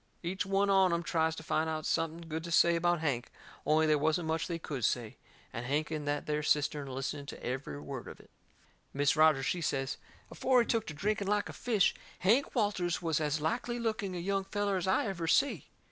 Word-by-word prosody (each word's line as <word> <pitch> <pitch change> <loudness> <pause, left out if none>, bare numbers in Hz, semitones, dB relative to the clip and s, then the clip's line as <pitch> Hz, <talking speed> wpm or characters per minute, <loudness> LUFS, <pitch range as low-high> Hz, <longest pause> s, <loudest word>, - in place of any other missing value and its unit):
Each 180 +1 -2
one 195 +1 +2
on 190 -2 +5
em 170 0 0
tries 160 -1 +1
to 160 - -8
find 160 0 0
out 155 -1 -3
something 165 +1 -1
good 160 0 -4
to - - -6
say 170 +1 +5
about 175 0 +1
Hank, 130 -6 -1 0.4
only 155 +1 +4
they 155 -1 +4
wasn't 160 +3 +1
much 160 0 0
they 170 - -2
could 145 -6 -5
say. 115 0 0 0.4
And 120 +2 -5
Hank 150 +3 0
in 155 -2 -3
that 145 0 -1
there 150 0 -1
cistern 150 -1 +1
a - - -7
listening 140 +2 -4
to - - -8
every 125 - -4
word 75 - -7
of - - -10
it. - - -19 0.6
Mis' 145 +1 +3
Rogers, 155 -4 +4
she 175 - -1
says: 135 -3 -1 0.3
"Afore 255 -1 +3
he - - 0
took 225 -2 0
to 155 - -6
drinking 200 +4 -1
like 205 0 +1
a - - -7
fish, 220 -6 +2 0.2
Hank 230 +12 +2
Walters 195 -7 0
was 160 -2 +1
as 150 0 0
likely 240 +9 -1
looking 215 -5 -2
a - - -3
young 195 +2 -1
feller 205 0 -1
as 185 - -2
I 220 +9 +2
ever 180 -5 -3
see." 280 - +2
165 Hz, 225 wpm, -32 LUFS, 150-195 Hz, 0.6 s, on